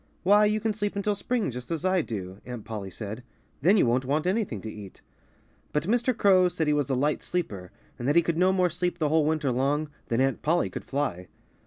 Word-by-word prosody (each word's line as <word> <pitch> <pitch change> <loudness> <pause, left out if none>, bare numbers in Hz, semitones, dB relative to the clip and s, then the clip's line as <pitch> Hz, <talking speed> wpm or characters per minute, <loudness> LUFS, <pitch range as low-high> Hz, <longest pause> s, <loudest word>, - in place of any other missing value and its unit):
"Why, 205 +3 +6
you 210 +1 +1
can 220 0 -1
sleep 205 -1 -3
until 200 +1 0
spring, 220 - -1
just 125 +1 -8
as 165 +1 -3
I 185 -1 +3
do," 95 -7 -6
Aunt 125 -3 -7
Polly 105 -3 -5
said. 105 +4 -6 0.4
"Then 190 +9 +5
you - - +4
won't 125 +2 +2
want 145 +5 0
anything 185 - 0
to 110 - -6
eat." 105 -3 -11 0.7
But 150 - +1
Mr. 240 +5 +1
Crow 185 -4 +5
said 165 -2 -1
he 150 - +2
was 145 -2 0
a 135 - +1
light 145 +4 0
sleeper 100 - -4 0.3
and 120 - -3
that 145 - +2
he 170 - +6
could 170 0 -1
no 185 +1 +4
more 180 -2 +2
sleep 180 +1 -2
the 155 -2 0
whole 155 -1 +3
winter 155 -4 +1
long 145 +4 0 0.2
than 115 - 0
Aunt 135 0 +1
Polly 170 +3 +1
could - - -7
fly. 135 -11 -2
155 Hz, 230 wpm, -27 LUFS, 125-185 Hz, 0.7 s, Why